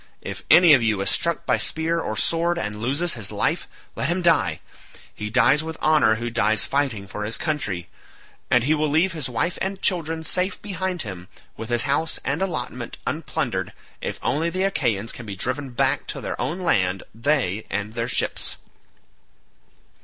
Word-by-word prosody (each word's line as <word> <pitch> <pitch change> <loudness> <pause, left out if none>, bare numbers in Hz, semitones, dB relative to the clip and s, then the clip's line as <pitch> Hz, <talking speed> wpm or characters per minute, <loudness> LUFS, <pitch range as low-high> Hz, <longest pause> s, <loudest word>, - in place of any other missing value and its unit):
If - - -6
any 175 -3 +8
of 130 - +6
you 110 -3 +1
is 100 - +2
struck 170 0 0
by - - +3
spear 165 +1 0
or 110 -9 -3
sword 170 +6 +2
and 105 -8 -4
loses 145 +8 +1
his 110 -4 -1
life, - - 0 0.3
let - - -1
him 180 +1 0
die; 95 - +3 0.5
he 105 0 -5
dies 130 +6 +4
with 160 0 -6
honour 155 -8 +4
who 120 +2 -4
dies 110 -2 +4
fighting 135 -8 0
for 105 +2 -6
his 110 +2 0
country; 105 - -2 0.6
and 120 -1 +4
he 150 +5 +3
will 155 -1 +1
leave 165 +6 +3
his 150 -5 -3
wife 150 +9 -1
and 195 0 -2
children 165 -3 0
safe 180 +4 0
behind 185 -3 -1
him, 95 -4 -7 0.3
with 115 +1 -7
his 120 -1 +3
house 145 +3 0
and 145 +6 -1
allotment 125 -9 -3
unplundered 130 - -2 0.3
if - - -3
only 160 +6 +1
the 185 +2 -1
Achaeans 115 - 0
can 120 - -9
be 100 - -5
driven 130 +7 -2
back 120 - 0
to - - -4
their - - -4
own 175 +4 -2
land, 95 - +1
they 115 -4 0
and 105 +2 -3
their 115 0 -2
ships." - - -1
135 Hz, 180 wpm, -23 LUFS, 110-165 Hz, 0.6 s, any